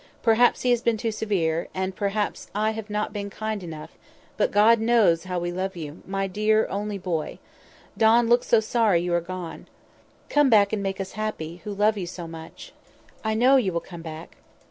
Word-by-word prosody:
Perhaps 235 Hz, +1 st, +4 dB
he 250 Hz, -, +3 dB
has 240 Hz, -1 st, +2 dB
been 235 Hz, -2 st, +1 dB
too 225 Hz, +1 st, -2 dB
severe, 175 Hz, -7 st, -1 dB
and 190 Hz, 0 st, -2 dB
perhaps 205 Hz, +1 st, -2 dB
I 215 Hz, +1 st, +1 dB
have 220 Hz, -1 st, -7 dB
not 210 Hz, 0 st, -2 dB
been 200 Hz, -1 st, -4 dB
kind 215 Hz, 0 st, -4 dB
enough; 160 Hz, -3 st, -8 dB, 0.4 s
but -, -, +1 dB
God 215 Hz, +3 st, +5 dB
knows 220 Hz, -8 st, +3 dB
how 180 Hz, -1 st, -3 dB
we 175 Hz, 0 st, -2 dB
love 190 Hz, +2 st, -3 dB
you, 155 Hz, -2 st, -8 dB
my 195 Hz, 0 st, -1 dB
dear 215 Hz, +3 st, +2 dB
only 205 Hz, +1 st, -3 dB
boy. 175 Hz, -5 st, -3 dB, 0.6 s
Don 230 Hz, +1 st, +4 dB
looks 240 Hz, +1 st, +3 dB
so 230 Hz, -, +5 dB
sorry 220 Hz, -5 st, +2 dB
you 175 Hz, -1 st, -1 dB
are 175 Hz, -, +2 dB
gone. 180 Hz, -1 st, -7 dB, 0.6 s
Come 290 Hz, -2 st, +3 dB
back, 205 Hz, -3 st, +4 dB
and 210 Hz, -, 0 dB
make 195 Hz, -1 st, -3 dB
us 195 Hz, 0 st, -4 dB
happy, 195 Hz, -7 st, -4 dB
who 210 Hz, -, -4 dB
love 210 Hz, +1 st, +2 dB
you 180 Hz, -, -4 dB
so 175 Hz, -1 st, -7 dB
much. 165 Hz, 0 st, -11 dB, 0.5 s
I 220 Hz, 0 st, 0 dB
know 255 Hz, +4 st, +5 dB
you 210 Hz, -8 st, +1 dB
will 170 Hz, -, -1 dB
come 170 Hz, -1 st, -11 dB
back." 160 Hz, 0 st, -9 dB
200 Hz, 200 wpm, -25 LUFS, 175-220 Hz, 0.6 s, God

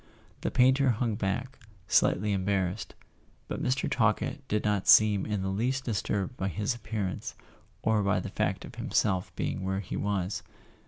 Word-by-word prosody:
The -, -, 0 dB
painter 130 Hz, +2 st, +4 dB
hung 115 Hz, -1 st, 0 dB
back, 115 Hz, +6 st, -3 dB, 0.3 s
slightly 105 Hz, +3 st, +3 dB
embarrassed; 95 Hz, 0 st, -1 dB, 0.5 s
but -, -, -4 dB
Mr. 130 Hz, +1 st, 0 dB
Talkett 115 Hz, +5 st, +1 dB
did 105 Hz, -4 st, 0 dB
not 105 Hz, -2 st, 0 dB
seem 105 Hz, -3 st, +6 dB
in 105 Hz, -3 st, -1 dB
the 95 Hz, -, -1 dB
least 125 Hz, +7 st, -1 dB
disturbed 105 Hz, 0 st, -2 dB
by 95 Hz, -, -1 dB
his 105 Hz, +5 st, -1 dB
appear¬ 110 Hz, -3 st, -3 dB
ance, -, -, -7 dB, 0.5 s
or 110 Hz, -1 st, +3 dB
by 100 Hz, 0 st, +2 dB
the -, -, -5 dB
fact -, -, -1 dB
of -, -, -11 dB
himself 95 Hz, -3 st, 0 dB
being -, -, -2 dB
where 95 Hz, 0 st, -1 dB
he 95 Hz, -, -5 dB
was. 100 Hz, -1 st, -1 dB
105 Hz, 165 wpm, -29 LUFS, 95-120 Hz, 0.5 s, seem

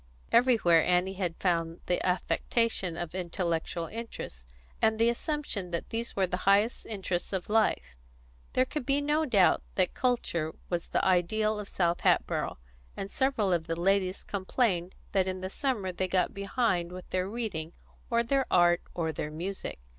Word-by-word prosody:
Everywhere 215 Hz, -10 st, +5 dB
Annie 180 Hz, +1 st, +2 dB
had 180 Hz, -3 st, -2 dB
found 165 Hz, -2 st, 0 dB
the 180 Hz, -, 0 dB
affectation 185 Hz, 0 st, 0 dB
of 170 Hz, -2 st, -4 dB
intellectual 170 Hz, -2 st, -2 dB
interests, 185 Hz, -, -7 dB, 0.3 s
and 220 Hz, 0 st, +3 dB
the 230 Hz, +1 st, +4 dB
assumption 240 Hz, -, -2 dB
that 170 Hz, -1 st, -4 dB
these 230 Hz, +1 st, -2 dB
were 195 Hz, -, +3 dB
the 180 Hz, 0 st, -2 dB
highest 205 Hz, +4 st, +3 dB
interests 190 Hz, -4 st, -2 dB
of 190 Hz, 0 st, -2 dB
life: 215 Hz, -, +1 dB, 0.5 s
there 255 Hz, -, +3 dB
could 295 Hz, +1 st, -4 dB
be 275 Hz, +3 st, +2 dB
no 300 Hz, +2 st, +1 dB
doubt 200 Hz, -7 st, +4 dB
that 185 Hz, -2 st, +2 dB
culture 175 Hz, -11 st, -1 dB, 0.2 s
was 170 Hz, -1 st, -1 dB
the -, -, 0 dB
ideal 210 Hz, +4 st, +2 dB
of 205 Hz, -, -7 dB
South 175 Hz, -2 st, +1 dB
Hatboro', -, -, +1 dB, 0.4 s
and 195 Hz, -, -5 dB
several 245 Hz, -8 st, +1 dB
of 165 Hz, -1 st, -1 dB
the 165 Hz, 0 st, -2 dB
ladies 190 Hz, +1 st, +1 dB
complained 190 Hz, -2 st, -1 dB, 0.2 s
that 190 Hz, -2 st, +2 dB
in 185 Hz, 0 st, -3 dB
the 185 Hz, 0 st, -4 dB
summer 225 Hz, -9 st, -1 dB
they 185 Hz, +1 st, -2 dB
got 185 Hz, -1 st, +1 dB
behind 200 Hz, -4 st, 0 dB
with 180 Hz, 0 st, -9 dB
their 185 Hz, +1 st, 0 dB
reading, 200 Hz, -8 st, -4 dB, 0.4 s
or 235 Hz, 0 st, +3 dB
their 270 Hz, +3 st, +1 dB
art, 175 Hz, -1 st, +4 dB
or 165 Hz, -2 st, -1 dB
their 150 Hz, -, -4 dB
music. 180 Hz, +6 st, -5 dB
190 Hz, 165 wpm, -29 LUFS, 175-225 Hz, 0.5 s, Everywhere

